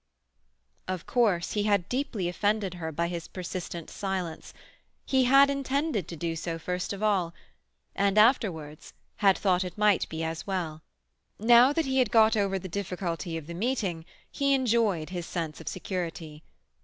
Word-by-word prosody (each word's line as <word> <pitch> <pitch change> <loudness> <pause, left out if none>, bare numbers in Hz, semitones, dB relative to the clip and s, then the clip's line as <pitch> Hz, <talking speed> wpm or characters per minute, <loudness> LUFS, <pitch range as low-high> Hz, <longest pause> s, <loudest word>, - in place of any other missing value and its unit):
Of 185 -2 -4
course 205 -8 +1
he 210 - 0
had 200 -4 +2
deeply 245 -8 -2
offended 205 +2 0
her 165 -3 -5
by 170 +3 -1
his 170 -1 -5
persistent 175 -2 -6
silence. 185 -5 -4 0.5
He 260 -1 +3
had 275 +2 +7
intended 275 - -1
to 170 - -7
do 165 +1 -3
so 165 +1 -4
first 180 +3 -3
of 200 +1 -5
all; 185 -6 +1 0.6
and 200 +1 +1
afterwards—had 195 - +1
thought 185 -2 +2
it 180 +1 -7
might 210 -3 +3
be 160 0 -4
as 160 +2 -4
well. 170 -5 -3 0.6
Now 240 +4 +6
that 325 +1 0
he 265 0 +1
had 250 -4 +3
got 220 0 +5
over 200 -2 +1
the 190 - -6
difficulty 175 -2 -3
of 160 - -7
the 170 - -7
meeting 195 -5 -2 0.3
he 275 -1 +2
enjoyed 225 -10 +1
his 175 -2 -4
sense 165 -3 -4
of - - -13
security. 165 -5 -5
190 Hz, 160 wpm, -28 LUFS, 170-220 Hz, 0.6 s, had